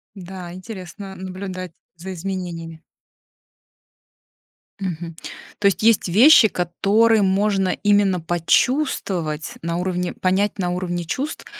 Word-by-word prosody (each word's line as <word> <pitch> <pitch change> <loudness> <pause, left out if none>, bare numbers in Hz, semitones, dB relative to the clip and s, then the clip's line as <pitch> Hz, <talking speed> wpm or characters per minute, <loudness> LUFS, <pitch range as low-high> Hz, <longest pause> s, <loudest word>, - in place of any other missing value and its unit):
Да, 180 -2 -8
интересно 190 0 -9
наблюдать 185 -1 -6 0.2
за 190 +3 -7
изменениями. 170 -3 -5 2.0
Мгм. 170 -3 -5 0.4
То 210 - -3
есть 200 - 0
есть 225 -3 +4
вещи, 230 - +7
которые 205 +5 +2
можно 195 0 +2
именно 205 -2 +2
почувствовать 170 - 0
на 170 +1 -2
уровне, 180 0 -2
понять 195 +3 0
на 180 -2 0
уровне 175 -1 -3
чувств, 270 - -4
185 Hz, 105 wpm, -21 LUFS, 175-200 Hz, 2.0 s, вещи